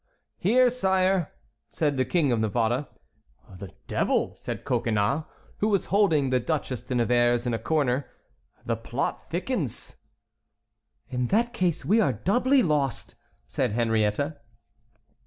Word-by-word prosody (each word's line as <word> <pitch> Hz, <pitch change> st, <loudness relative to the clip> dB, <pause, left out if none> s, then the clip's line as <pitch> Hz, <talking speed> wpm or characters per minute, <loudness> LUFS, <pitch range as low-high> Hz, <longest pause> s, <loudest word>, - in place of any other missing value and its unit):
"Here, 245 Hz, +6 st, +4 dB
sire," 190 Hz, -6 st, +1 dB, 0.4 s
said 150 Hz, -3 st, 0 dB
the 130 Hz, -1 st, +1 dB
King 160 Hz, -7 st, +1 dB
of 120 Hz, -, +1 dB
Navarre. 115 Hz, +5 st, 0 dB, 0.7 s
"The 100 Hz, -3 st, -8 dB
devil!" -, -, 0 dB
said -, -, -6 dB
Coconnas, 110 Hz, +7 st, 0 dB, 0.3 s
who 210 Hz, -, +1 dB
was 200 Hz, -3 st, +1 dB
holding 160 Hz, -10 st, +3 dB
the 130 Hz, -, +3 dB
Duchesse 130 Hz, -2 st, -2 dB
de 125 Hz, +1 st, -4 dB
Nevers 120 Hz, 0 st, +2 dB
in 120 Hz, -, 0 dB
a 115 Hz, -, -1 dB
corner, 135 Hz, -1 st, 0 dB, 0.6 s
"the -, -, 0 dB
plot -, -, -4 dB
thickens." -, -, -3 dB, 1.1 s
"In 125 Hz, -2 st, -1 dB
that 235 Hz, -, +1 dB
case 180 Hz, -8 st, -1 dB
we 220 Hz, +4 st, +4 dB
are -, -, +2 dB
doubly 255 Hz, +7 st, +2 dB
lost," 145 Hz, -, -1 dB, 0.3 s
said 80 Hz, -, -1 dB
Henriette. 115 Hz, +5 st, 0 dB
140 Hz, 130 wpm, -26 LUFS, 120-190 Hz, 1.1 s, Here